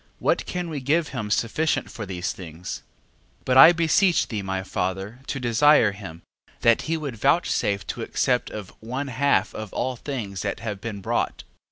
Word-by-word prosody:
What - - 0
can 180 -1 -3
we 155 -3 -4
give 150 +5 +1
him 115 -6 -4
sufficient 120 +9 0
for 105 -3 -7
these 90 -1 -3
things? 85 0 -7 0.6
12:4. - - -32
But 130 0 +3
I 135 +6 +11
beseech 170 +2 +3
thee, 105 -3 -3
my 95 -1 -3
father, 95 +5 -3
to 135 - -3
desire 120 -1 +4
him, 95 -5 -10 0.4
that 115 -1 +4
he 165 - +1
would 140 -7 -5
vouchsafe 105 - +1
to - - -5
accept - - 0
of 105 -3 -8
one 130 +5 -4
half 140 +3 +1
of 110 -2 -6
all 130 0 -1
things 115 -8 -5
that - - -3
have 105 -4 -5
been 105 -3 -5
brought. - - -1
115 Hz, 180 wpm, -24 LUFS, 100-140 Hz, 0.6 s, I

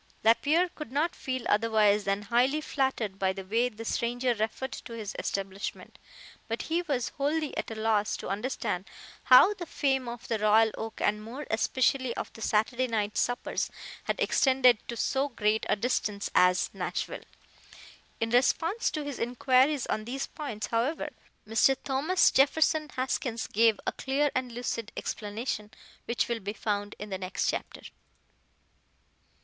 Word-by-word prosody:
Lapierre 295 +10 +4
could 305 -7 -9
not 305 +5 0
feel 260 -1 -4
otherwise 210 -1 +3
than 195 +1 0
highly 245 +7 +2
flattered 265 -10 -1
by 190 -1 +2
the 195 0 -6
way 230 +5 +1
the 225 -1 -9
stranger 245 +2 0
referred 225 +4 -3
to 235 - -8
his 215 -3 -6
establishment, 195 0 -4 0.5
but 230 +1 -3
he 330 +2 0
was 280 -8 -1
wholly 300 +2 0
at - - -3
a 225 - -5
loss 215 -1 +1
to - - -7
understand 210 -2 -2 0.4
how 260 +11 +8
the 365 -4 -7
fame 265 -4 0
of 235 0 -8
the 225 - -1
Royal 215 +1 +5
Oak, 225 0 -6
and 210 0 +1
more 255 +7 -7
especially 255 +2 +1
of - - -5
the 225 - -12
Saturday 235 +5 +1
night 215 -3 -1
suppers, 245 0 -1 0.4
had - - -1
extended 260 -4 +4
to 235 - -5
so 275 +4 0
great 220 -3 0
a - - +4
distance 210 -2 -1
as 180 0 +4
Nashville. - - -3 1.0
In 225 0 -1
response 325 - +2
to 305 - -3
his 285 -2 -5
inquiries 255 +3 +2
on 215 0 -2
these 270 +4 -3
points, 235 -9 -5
however, 240 +8 -1 0.4
Mr. 225 +5 +4
Thomas 295 +7 +3
Jefferson 305 +2 +3
Haskins 255 -3 -2
gave 225 0 +3
a - - +1
clear 280 +2 0
and 255 -1 -2
lucid 230 -2 -4
explanation, 210 0 -4 0.4
which 235 -3 0
will 235 -1 -2
be 205 0 -4
found 205 -1 -2
in 210 0 -8
the 190 - -3
next 185 0 -2
chapter. - - -6
235 Hz, 155 wpm, -29 LUFS, 215-270 Hz, 1.0 s, how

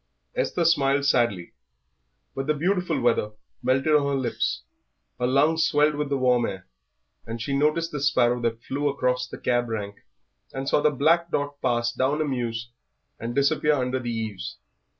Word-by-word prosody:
Esther - - 0
smiled 140 -4 +3
sadly. 120 -10 +1 0.8
But 135 +1 -4
the 155 - +2
beautiful 180 +4 0
weather 115 -3 +1 0.3
melted 135 +5 +2
on 145 -2 +4
her 140 - 0
lips, 120 - -2 0.6
her 125 - +1
lungs 150 +5 +3
swelled 150 0 +3
with 145 -1 -3
the 140 - 0
warm 125 -2 +2
air, 95 -1 -7 0.6
and 115 +1 -5
she 135 +5 -2
noticed 155 +4 +1
the 150 - -4
sparrow 125 -4 +2
that 115 -1 -2
flew 145 +2 -1
across 125 -2 0
the - - -8
cab 120 -1 0
rank, 105 -2 -4 0.6
and 135 0 -4
saw 145 - +3
the 150 - +4
black 165 +4 +2
dot 145 -1 -3
pass 120 -2 +1
down 140 +4 0
a 155 - +1
mews 120 -4 -3 0.5
and 115 +1 -5
disappear 150 +2 +2
under 130 -2 0
the 120 -1 -4
eaves. 110 -4 -4
135 Hz, 170 wpm, -25 LUFS, 120-150 Hz, 0.8 s, on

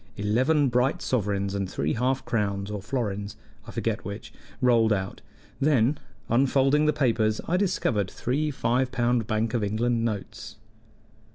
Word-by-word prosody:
Eleven 130 +9 +2
bright 125 +3 +1
sovereigns 100 -5 -1
and 100 -2 -2
three 75 -3 -1
half 130 +3 0
crowns 100 -2 -1
or 105 -1 -4
florins, 105 -3 -3 0.3
I - - -7
forget - - -2
which, - - -7 0.3
rolled 115 -3 +4
out; 95 -2 -2 0.4
then, 140 -1 +2 0.3
unfolding 135 +4 +3
the - - +5
papers, 115 -7 +1
I 175 - +1
discovered 175 - 0
three 145 +5 -1
five 130 -1 0
pound 120 -3 +1
Bank 110 +1 0
of 120 -3 0
England 115 +3 0
notes. 105 -4 -4
115 Hz, 145 wpm, -26 LUFS, 105-130 Hz, 0.4 s, the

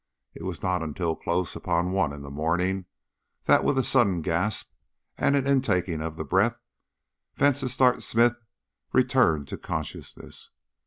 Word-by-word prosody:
It - - -11
was 85 -3 -5
not 90 -1 0
until 80 +1 -2
close 85 +1 -2
upon 85 +2 -1
one 95 -5 +1
in 70 0 -8
the 70 - -9
morning 90 +6 -1 0.6
that, - - +5
with 140 - +1
a 130 - +3
sudden 100 -12 +2
gasp 90 +7 -1 0.4
and 140 - +2
an 140 -2 +1
intaking 95 - +1
of 80 0 -4
the - - -3
breath, 95 +10 +2 0.8
Vansittart 130 -2 +3
Smith 120 +1 +3 0.6
returned 125 - +3
to - - -6
consciousness. - - -6
90 Hz, 145 wpm, -26 LUFS, 80-120 Hz, 0.8 s, that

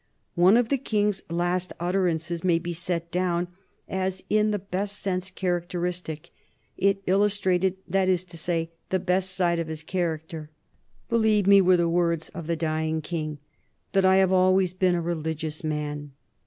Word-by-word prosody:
One 185 +5 +5
of 240 -2 +2
the 275 - +1
King's 210 -5 0
last 175 +2 -1
utterances 175 -2 0
may 175 -2 +3
be 175 +1 -4
set 170 0 -2
down 175 -1 0 0.4
as 190 0 -2
in 215 0 +3
the 210 - 0
best 200 +1 -3
sense 185 -2 -2
characteristic 175 -3 -3 0.4
it 195 0 +1
illustrated, 190 -1 +2
that 190 +1 +1
is 180 -1 +2
to 175 -1 -12
say, 165 0 -2 0.2
the 190 - +2
best 185 +1 +1
side 175 -2 +2
of 165 - -2
his 160 -1 -5
character. 160 -3 -3 0.6
"Believe 220 -3 +3
me," 200 0 +7
were 185 -1 +5
the 170 -1 +2
words 170 -1 0
of 170 -2 -8
the 170 - 0
dying 160 0 -1
King, 155 -2 -4 0.5
"that 195 -1 +3
I 190 0 +5
have 190 -1 +4
always 185 0 +3
been 185 -1 +2
a 170 - 0
religious 160 -2 -3
man." 150 -2 -3
180 Hz, 165 wpm, -26 LUFS, 165-190 Hz, 0.6 s, me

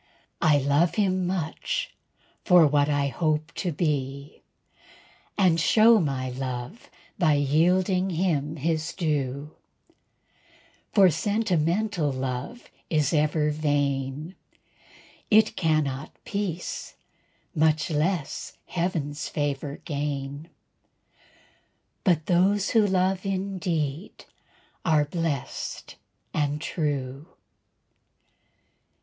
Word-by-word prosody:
I 150 -2 +5
love 145 +5 +2
him 185 -3 +1
much 175 -4 -2 0.5
for 180 -3 +6
what 145 0 +3
I 145 -1 +1
hope 155 +3 -1
to 180 - -2
be, 140 -3 -2 1.0
And 180 -5 +4
show 220 +8 +6
my 135 -6 -2
love 130 - -6 0.3
by 160 -5 +4
yielding 180 +6 +2
him 160 -4 0
his 160 +1 -1
due; 145 -3 -2 1.4
For 195 -4 +6
sentimental 180 -2 0
love 130 - -4 0.3
is 150 -2 +1
ever 150 0 +2
vain, 145 +1 -1 1.0
It 215 0 +5
cannot 155 -4 0
peace, 195 -4 -4 0.6
much 155 -1 +2
less 155 0 -2
heaven's 160 -5 -2
favor 145 0 -3
gain; 145 0 -4 1.5
But 165 -5 +2
those 190 +3 +2
who 220 -3 +4
love 185 0 +1
in 195 -1 -2
deed 160 0 -3 0.6
are 155 -3 +3
blessed 150 -3 -4 0.4
and 150 -1 0
true. 145 -3 -3
155 Hz, 90 wpm, -26 LUFS, 145-180 Hz, 1.5 s, for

